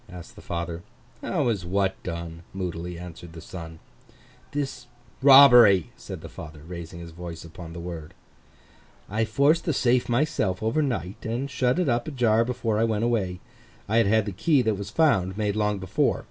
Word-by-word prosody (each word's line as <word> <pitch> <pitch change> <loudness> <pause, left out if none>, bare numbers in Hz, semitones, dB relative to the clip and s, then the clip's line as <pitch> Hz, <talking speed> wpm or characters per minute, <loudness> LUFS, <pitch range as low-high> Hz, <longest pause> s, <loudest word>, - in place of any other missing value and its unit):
asked 90 -3 -11
the - - -12
father. 85 0 -4 0.4
'How - - -1
was 110 -6 0
what 95 +2 -1
done?' 85 -1 -6
moodily 90 -2 -4
answered 85 -1 -10
the 80 - -9
son. 80 -1 -9 0.7
'This 135 -4 -4 0.3
robbery,' 125 - +8
said - - -9
the - - -8
father, 80 -1 -10
raising 85 -1 -8
his 85 -1 -9
voice 85 -1 -8
upon 85 0 -10
the 85 - -7
word. 85 -3 -7 1.0
'I 110 +2 +1
forced 140 +8 +2
the 160 - +1
safe 125 -1 +2
myself 120 - 0
over 115 +8 +1
night, 105 - -3
and 120 +5 -3
shut 125 +2 +1
it 180 -3 +1
up 120 -2 0
ajar 120 -6 +2
before 115 -3 -1
I - - +3
went 110 -1 0
away. 95 -7 -1 0.5
I 110 +2 +1
had 115 - +4
had 110 0 +3
the 105 - -3
key 130 - +2
that 110 -1 +1
was 100 0 -6
found, 100 - +2
made 105 -2 -1
long 105 -1 0
before. 95 -2 0
100 Hz, 180 wpm, -25 LUFS, 85-120 Hz, 1.0 s, robbery